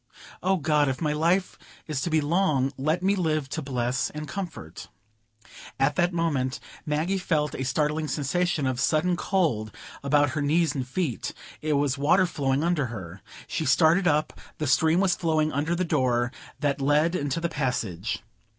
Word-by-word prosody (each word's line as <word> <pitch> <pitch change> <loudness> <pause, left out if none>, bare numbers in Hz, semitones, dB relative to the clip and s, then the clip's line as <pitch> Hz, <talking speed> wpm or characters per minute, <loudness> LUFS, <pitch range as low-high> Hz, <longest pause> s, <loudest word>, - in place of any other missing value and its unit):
"O 190 +1 +2
God, 150 -3 +2
if 130 - -3
my 150 -2 0
life 170 +5 +1 0.3
is 150 -4 -3
to 175 - -1
be 160 -1 +2
long, 145 -4 +1
let 155 +7 -1
me 195 +2 +3
live 155 -6 0
to 160 - -3
bless 125 -2 -1
and 150 0 -7
comfort——" 165 - -7 0.9
At 140 +2 +2
that 175 +4 +2
moment 145 -7 -1 0.3
Maggie 160 +6 0
felt 150 -4 0
a 130 - -3
startling 150 +3 0
sensation 155 +1 0
of 130 -1 -1
sudden 160 +6 +2
cold 150 - 0 0.3
about 145 0 +3
her 150 +1 -2
knees 155 +1 +2
and 130 -4 -3
feet; 135 -2 -3 0.3
it 155 0 0
was 140 -1 +1
water 150 +6 +4
flowing 140 -4 0
under 165 -6 +1
her. 95 -5 -8 0.2
She - - -3
started 160 +7 +4
up; 150 -1 +1 0.2
the 155 - -2
stream 160 +5 +3
was 190 -2 +3
flowing 155 -2 +1
under 155 +4 0
the 180 +1 0
door 125 -6 +1 0.3
that 140 -2 0
led 150 +4 +3
into 145 -3 -1
the 170 - 0
passage. 115 - -2
150 Hz, 170 wpm, -26 LUFS, 135-170 Hz, 0.9 s, water